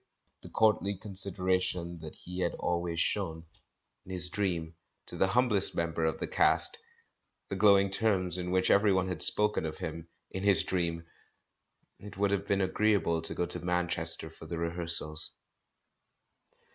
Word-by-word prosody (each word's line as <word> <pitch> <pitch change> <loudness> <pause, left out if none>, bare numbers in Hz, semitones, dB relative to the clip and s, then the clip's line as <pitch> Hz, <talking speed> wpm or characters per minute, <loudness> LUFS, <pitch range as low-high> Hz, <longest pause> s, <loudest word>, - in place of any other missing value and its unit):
The - - -12
courtly 105 -2 +1
consideration 95 -3 +1
that 80 -1 -10
he 90 +1 -9
had - - -1
always 85 -1 -3
shown 85 -4 -2 0.3
— - - -53
in - - -9
his 90 -1 -2
dream 85 -5 -3 0.2
— - - -52
to - - -10
the 95 - +1
humblest 105 -2 +1
members 85 -1 -1
of - - -13
the - - -2
cast! - - +2 0.7
The 100 - -4
glowing 100 -1 +4
terms 95 -4 0
in 90 0 -4
which 95 0 +1
everyone 95 -2 +2
had 90 - -5
spoken 105 -3 +5
of 80 -1 -5
him 80 +1 -7
— - - -52
in 95 - -5
his 100 -5 +3
dream!... 85 -2 -3 0.9
It 105 -2 -12
would 100 0 0
have 100 0 -2
been 100 0 0
agreeable 95 -4 0
to 80 - +2
go 90 - -1
to - - -2
IManchester 90 -2 +1
for 80 - -13
the 85 +1 -5
rehearsals. 85 -2 -1
90 Hz, 165 wpm, -29 LUFS, 85-100 Hz, 0.9 s, spoken